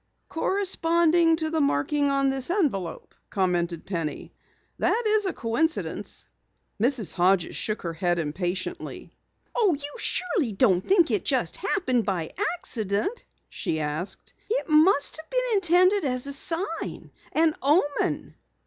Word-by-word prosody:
"Corresponding 340 -2 +2
to 315 -1 -2
the 320 -1 +1
marking 285 - +1
on 275 -1 +2
this 270 +1 +1
envelope," 275 - -1 0.2
commented 175 -3 -1
Penny. 165 -5 -4 0.5
"That 475 - +2
is 425 -2 +3
a - - 0
coincidence." 315 +8 -2 0.6
Mrs. 240 -4 +1
Hodges 180 -1 +2
shook 215 0 -3
her 170 -1 -3
head 175 +1 0
impatiently. 180 - -4 0.4
"You 400 -10 +3 0.2
surely 325 - -1
don't 190 -4 +3
think 355 - +3
it - - 0
just - - 0
happened 255 - 0
by 180 -6 -2 0.2
accident?" 230 - -2 0.2
she 160 - -3
asked. 155 +6 -4 0.2
"It 485 +3 -1
must 310 -1 +4
have 315 0 -10
been - - 0
intended 370 +1 +4
as 255 -2 0
a 280 - -2
sign 335 +7 -2 0.2
an 320 0 +3
omen." 290 +1 +1
280 Hz, 130 wpm, -26 LUFS, -, 0.6 s, must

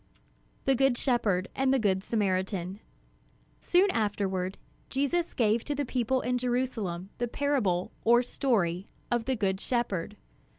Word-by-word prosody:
THE 270 - +4
GOOD 265 -1 +3
SHEPHERD 210 -9 +1
AND 265 0 +2
THE 270 - +4
GOOD 195 -5 +1
SAMARITAN 190 -3 -1 0.8
Soon 370 +2 +3
afterward 195 -3 -1 0.3
Jesus 285 +6 0
gave 225 -1 +2
to 290 - -2
the 285 0 -1
people 255 +1 0
in 250 0 0
Jerusalem 230 -7 -2
the 240 - 0
parable 235 -10 0
or 240 +2 +5
story 195 -9 0 0.2
of 240 -1 +1
"The 260 - +1
Good 195 -4 0
Shepherd." 210 -5 -1
230 Hz, 135 wpm, -29 LUFS, 190-260 Hz, 0.8 s, or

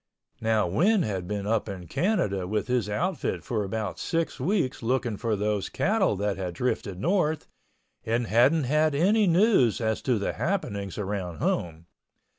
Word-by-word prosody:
Now 110 -2 +2
Win 180 - +3
had 95 -4 -3
been 100 0 -3
up 110 0 0
in 95 -3 -6
Canada 100 - 0
with 105 +1 -1
his 125 -4 0
outfit 170 - -2
for 110 -4 -1
about 105 0 -4
six 165 -3 -2
weeks 160 -2 0
looking 120 -1 0
for 115 +1 -1
those 105 -1 -1
cattle 200 - +1
that 100 0 -1
had 90 -2 -4
drifted 100 -4 -2
north 160 - +1 0.6
and 115 +2 0
hadn't 130 +9 +4
had 150 +3 +2
any 205 +7 +3
news 175 - +4
as 110 -2 -1
to 125 -3 +1
the 100 - -2
happenings 105 - -2
around 95 -5 -3
home. 80 0 -2
115 Hz, 160 wpm, -27 LUFS, 100-155 Hz, 0.6 s, hadn't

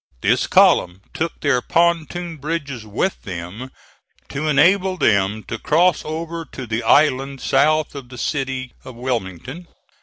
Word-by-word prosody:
This - - +2
column 90 +2 +4
took 165 0 -3
their 140 -4 +2
pontoon 170 +1 0
bridges 140 -6 -4
with 115 - -2
them, 95 +7 -7 0.6
to 150 +3 -3
enable 185 +6 +3
them 105 - +2
to 115 - -6
cross 170 +2 +3
over 165 +1 -5
to 130 -4 -9
the 115 0 -2
island 135 -1 +2
south 150 +4 +2
of 135 -4 -9
the 125 - -10
city 130 -2 -3
of 130 - -10
Wilmington. 125 - -4
140 Hz, 140 wpm, -20 LUFS, 120-165 Hz, 0.6 s, column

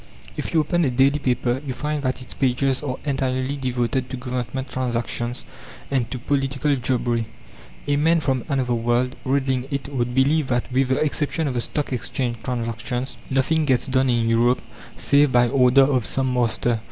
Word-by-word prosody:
If - - -4
you 160 - +4
open 175 +3 +1
a 140 - +2
daily 135 +4 +3
paper 125 -1 0
you 130 -3 -4
find 150 +1 -2
that 130 -1 -2
its - - -10
pages 135 0 +1
are 135 -4 -3
entirely 130 -1 -1
devoted 130 -1 -1
to 130 - -4
Government 125 +1 -4
transactions 120 -1 -2 0.5
and 125 -4 0
to 130 - -4
political 140 +2 0
jobbery. 120 -3 0 0.6
A 145 - +1
man 165 +3 +3
from 135 -5 0
another 130 -3 0
world, 120 +2 +1
reading 130 -1 0
it, 140 0 -3
would 120 -2 -1
believe 140 +2 +3
that, 120 0 -1
with 130 +1 +2
the 130 - +1
exception 155 +1 0
of 135 - -1
the 120 - -1
Stock 145 +2 -3
Exchange 120 -1 -2
transactions, 120 +1 -3
nothing 135 +4 +2
gets 130 -4 +2
done 130 -1 +2
in 120 -2 +2
Europe 120 +2 +3 0.4
save 140 -1 +4
by 120 -1 +4
order 130 +1 +5
of 135 -3 +2
some 130 +3 -1
master. 120 -1 +1
130 Hz, 175 wpm, -23 LUFS, 125-140 Hz, 0.6 s, order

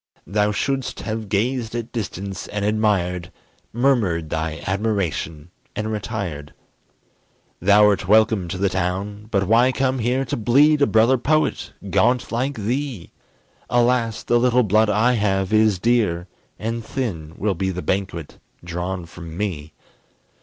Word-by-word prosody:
Thou 105 +4 +1
shouldst 135 +4 -2
have 110 -1 -4
gazed 115 +3 -1
at 120 0 -4
distance, 100 -4 -5
and 105 -1 -3
admired, 95 -5 0 0.4
Murmured 110 - +1
thy 80 0 -3
admiration 95 - -2 0.2
and 110 +1 -2
retired. 100 -9 -5 1.1
Thou'rt 100 0 +4
welcome 110 -2 +4
to 95 - -4
the 100 +1 +1
town; 95 +3 -3
but 100 -3 +1
why 120 +4 +5
come 130 0 0
here 125 +4 0
To - - -2
bleed 145 +7 +4
a 140 - +5
brother 115 +4 +4
poet, 155 +4 0 0.2
gaunt 125 +1 +2
like 130 +4 -1
thee? 120 -2 -3 0.6
Alas! 120 -2 +1
the 120 - +2
little 125 0 +3
blood 110 +1 +3
I 115 +5 +3
have 95 -3 0
is 110 -2 +4
dear, 100 -5 +1 0.3
And 115 +1 -3
thin 90 - -4
will 105 0 0
be 95 +2 -2
the 90 -1 -4
banquet 95 -5 -3 0.2
drawn 90 +1 -4
from 85 -1 -10
me. 85 -7 -3
105 Hz, 140 wpm, -22 LUFS, 95-120 Hz, 1.1 s, why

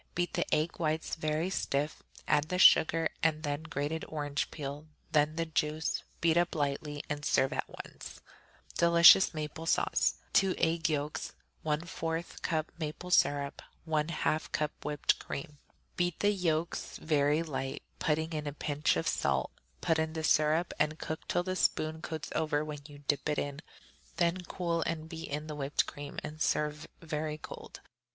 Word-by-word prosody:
Beat 175 -1 0
the - - -1
egg 155 +2 +1
whites 160 -1 -1
very 155 +3 -1
stiff, 145 -4 -1 0.3
add 150 -1 +3
the 180 - 0
sugar, 165 -3 +6
then 155 -1 +2
the 145 -1 -1
grated 160 0 -3
orange 145 -2 -2
peel, 145 0 -6 0.2
then 150 0 +3
the 165 0 0
juice; 155 0 -1 0.2
beat 165 0 +4
up 175 0 +2
lightly 145 0 -2
and 145 0 -3
serve 135 -2 +2
at - - -2 0.2
once. - - -10 0.6
Delicious 170 +2 +8
Maple 155 +1 -5
Sauce - - +2 0.2
2 195 -1 +4
egg 165 0 +1
yolks. 150 -1 -2 0.3
1/4 165 +2 -3
cup 155 -1 -1
maple 160 +3 -5
syrup. 145 -4 +2 0.3
1/2 155 0 0
cup 150 0 0
whipped 150 -1 +1
cream. 145 0 -6 0.4
Beat 175 -2 0
the 205 - +4
yolks 170 -4 -1
very 150 0 +2
light, 135 -4 -4 0.2
putting 160 +1 0
in 150 -1 -3
a 145 - -3
pinch 150 - 0
of 80 - -1
salt; 70 -1 +1 0.3
put 160 -1 +2
in 160 0 -1
the 160 -1 -3
syrup 155 +3 +3
and 155 +1 +1
cook 160 +1 -5
till 175 - +1
the 185 0 -2
spoon 160 -3 +1
coats 160 -1 -5
over 155 -1 0
when 150 -1 -5
you 145 -1 -13
dip 145 0 +1
it 150 - 0
in; 145 +1 -3 0.6
then 175 +1 +2
cool 170 -2 -1
and 160 -1 -2
beat 165 0 -6
in 150 +2 -3
the 155 - -5
whipped 140 0 0
cream, 145 0 -8
and 155 0 -7
serve 150 0 0 0.2
very 155 -1 -3
cold. - - -10
155 Hz, 165 wpm, -31 LUFS, 150-165 Hz, 0.6 s, Delicious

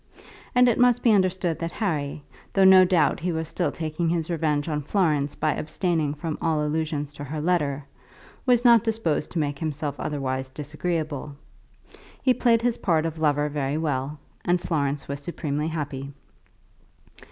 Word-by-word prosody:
And 250 0 +6
it 240 - +2
must 245 -1 +4
be 235 - +5
understood 185 -4 +1
that 165 0 -4
Harry, 150 -8 -2 0.3
though 195 - +4
no 190 0 +9
doubt 175 -4 +2
he 175 +2 -1
was 160 -1 -3
still - - -1
taking 160 +1 -2
his 165 0 -1
revenge 150 -3 0
on 150 -2 -1
Florence 150 -4 0
by 155 -1 0
abstaining 155 -2 -1
from 155 +1 -4
all 155 -2 +1
allusion 155 -1 -1
to 145 0 -10
her 150 +3 -5
letter, 150 -4 0 0.6
was 245 -2 +3
not 235 -3 +7
disposed 220 -10 -1
to - - -3
make 145 -3 -1
himself 150 -2 -3
otherwise 130 -2 -3
disagreeable. 150 0 -4 0.8
He 255 - +3
played 230 -2 +2
his 240 -1 +1
part 165 -3 +1
of 165 -1 -4
lover 150 -1 +2
very 145 -1 -2
well, 145 -2 -2 0.3
and 175 0 +2
Florence 145 -5 -1
was 140 0 -4
supremely 150 -1 -3
happy. 140 -4 -4
155 Hz, 165 wpm, -25 LUFS, 145-180 Hz, 0.8 s, no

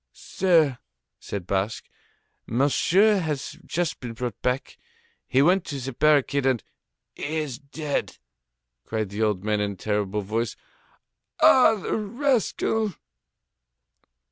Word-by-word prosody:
"Sir," 160 -9 +2 0.4
said 100 -4 -6
Basque, 100 +4 -2 0.6
"Monsieur 180 - +3
has 150 -5 -4
just 175 -1 -1
been 120 -2 -6
brought 120 +1 -5
back. 125 +1 -2 0.5
He 135 +2 +3
went 180 +3 +4
to 140 -3 -5
the 135 +1 -5
barricade, 140 0 +3
and...." 125 -5 +1 0.5
"He 155 +2 -4
is 150 -6 -3
dead!" 145 +1 -4 0.7
cried 110 -3 -3
the 100 +2 -5
old 105 -4 +1
man 105 0 0
in 100 -1 -1
a - - -12
terrible 105 +1 -1
voice. 110 +3 -2 0.8
"Ah! 250 -4 +7
The 200 - -3
rascal!" 225 - 0
135 Hz, 120 wpm, -25 LUFS, 110-170 Hz, 0.8 s, Ah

